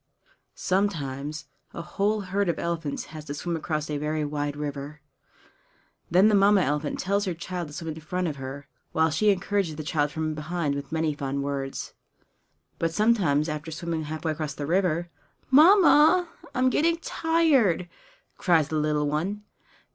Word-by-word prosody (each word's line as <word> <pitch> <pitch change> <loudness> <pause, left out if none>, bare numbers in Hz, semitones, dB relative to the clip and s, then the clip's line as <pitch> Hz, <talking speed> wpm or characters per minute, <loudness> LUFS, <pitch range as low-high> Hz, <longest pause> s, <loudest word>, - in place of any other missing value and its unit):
Sometimes 150 -6 -2 0.3
a 170 - -5
whole 205 +4 0
herd 195 0 -1
of 170 - 0
elephants 165 -4 -3
has 155 -1 -8
to 145 - -5
swim 170 +3 -3
across 155 -1 -2
a 150 -1 -3
very 150 +1 -1
wide 145 0 -3
river. 145 0 -5 1.1
Then 185 +5 +5
the 215 - +3
Mamma 200 0 +5
elephant 150 -1 -1
tells 200 +2 0
her 180 -3 -2
child 175 0 -5
to 145 - -12
swim 165 -1 -4
in 160 - -10
front 180 +3 -2
of 150 -3 -4
her, 135 +1 -7 0.3
while 160 0 +3
she 210 +7 +2
encourages 195 -4 0
the 155 - -5
child 150 -1 0
from 155 +1 -2
behind 155 0 -2
with 140 0 -6
many 160 -1 0
fond 140 -1 -3
words. 140 -1 -4 0.9
But 165 -1 0
sometimes 175 -8 +2
after 155 0 -4
swimming 160 -1 -3
halfway 155 +1 -3
across 155 -2 -4
the 145 - -4
river 175 0 +1 0.4
"Mamma, 340 +2 +6 0.3
I - - -2
am 255 0 +3
getting 330 +4 +2
tired!" 315 - +2 0.5
cries 165 -5 +3
the 155 - -1
little 150 -1 +1
one. 180 +8 -2
160 Hz, 165 wpm, -26 LUFS, 150-195 Hz, 1.1 s, Mamma